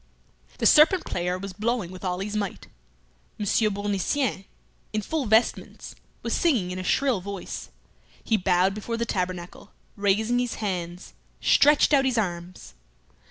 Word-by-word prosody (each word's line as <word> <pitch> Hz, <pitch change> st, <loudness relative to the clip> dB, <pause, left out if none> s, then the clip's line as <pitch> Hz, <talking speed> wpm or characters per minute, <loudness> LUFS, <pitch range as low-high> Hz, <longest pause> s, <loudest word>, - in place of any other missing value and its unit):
The -, -, -2 dB
serpent 320 Hz, +4 st, +6 dB
player 180 Hz, +1 st, -2 dB
was 195 Hz, 0 st, -7 dB
blowing 215 Hz, -2 st, -2 dB
with 185 Hz, +1 st, -10 dB
all 180 Hz, 0 st, -2 dB
his 205 Hz, +2 st, -4 dB
might. 200 Hz, -3 st, -3 dB, 0.7 s
Monsieur 215 Hz, +1 st, +1 dB
Bournisien, 205 Hz, +3 st, -1 dB, 0.5 s
in 215 Hz, 0 st, -1 dB
full 300 Hz, +1 st, -2 dB
vestments, 220 Hz, +3 st, +1 dB, 0.3 s
was -, -, -2 dB
singing 245 Hz, -, +1 dB
in 185 Hz, -, -4 dB
a -, -, -4 dB
shrill 255 Hz, +1 st, +1 dB
voice. 200 Hz, 0 st, -6 dB, 0.5 s
He 225 Hz, -, +1 dB
bowed 185 Hz, -1 st, +2 dB
before 220 Hz, +3 st, -4 dB
the 235 Hz, -, -1 dB
tabernacle, 180 Hz, -1 st, -4 dB, 0.2 s
raising 215 Hz, +4 st, +1 dB
his 245 Hz, -1 st, -2 dB
hands, 180 Hz, -4 st, -4 dB, 0.3 s
stretched 295 Hz, +1 st, +4 dB
out 270 Hz, -1 st, +5 dB
his 255 Hz, -2 st, +1 dB
arms. 175 Hz, -, -4 dB
205 Hz, 145 wpm, -25 LUFS, 185-235 Hz, 0.7 s, serpent